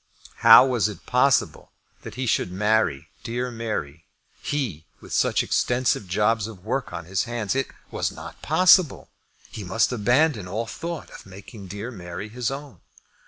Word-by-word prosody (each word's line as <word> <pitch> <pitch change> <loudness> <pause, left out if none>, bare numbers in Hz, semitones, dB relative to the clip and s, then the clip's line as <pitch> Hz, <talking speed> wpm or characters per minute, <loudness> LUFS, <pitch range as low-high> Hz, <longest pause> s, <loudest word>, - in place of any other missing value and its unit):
How 115 +3 +9
was 120 -5 +1
it 100 -5 -10
possible 125 +1 +1 0.3
that - - -9
he 130 0 -3
should 100 -6 0
marry 105 -7 +1
dear 125 +1 -3
Mary, 95 -10 -5 0.3
he, 110 - -3
with - - -10
such - - +2
extensive 120 -5 0
jobs 105 +3 +1
of 100 -4 -12
work 130 +4 -2
on 85 - -6
his 95 +5 -1
hands! 115 -4 -2
It 135 0 -1 0.2
was - - -2
not - - -11
possible. 185 -3 +4 0.4
He 105 - -7
must 100 +7 +1
abandon 125 - +2
all 110 +6 -3
thought 165 +9 -6
of - - -12
making 95 +1 -11
dear 105 +6 -6
Mary 90 0 -7
his 120 +1 -2
own. 140 0 -8
115 Hz, 160 wpm, -24 LUFS, 95-125 Hz, 0.4 s, How